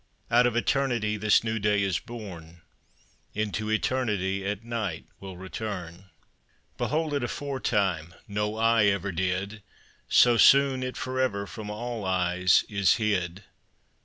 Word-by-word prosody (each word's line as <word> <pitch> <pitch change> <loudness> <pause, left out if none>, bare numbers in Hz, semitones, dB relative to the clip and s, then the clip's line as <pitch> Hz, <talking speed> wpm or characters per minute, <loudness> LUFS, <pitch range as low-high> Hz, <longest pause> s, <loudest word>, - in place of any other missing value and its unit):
Out 120 +1 +5
of 120 - -2
Eternity 120 -3 +1
This 105 +1 +3
new 110 0 -1
day 105 0 +2
is 95 -3 0
born; 85 -8 -10 0.7
Into 105 0 -2
Eternity, 105 -5 0
At 105 +2 -3
night 115 -8 -4
will 95 -2 -9
return. 95 -2 -6 0.7
Behold 155 0 -1
it 140 -3 -1
aforetime 105 - -1
No 105 +1 -2
eye 115 -1 +4
ever 100 -1 +1
did; 95 +4 -2 0.5
So 120 -1 +5
soon 135 +1 +5
it 130 0 -4
for 130 0 -3
ever 100 -6 0
From 105 +1 -8
all 115 +1 -5
eyes 90 -1 +2
is 100 -2 +3
hid. 100 -4 -1
105 Hz, 130 wpm, -27 LUFS, 95-120 Hz, 0.7 s, Out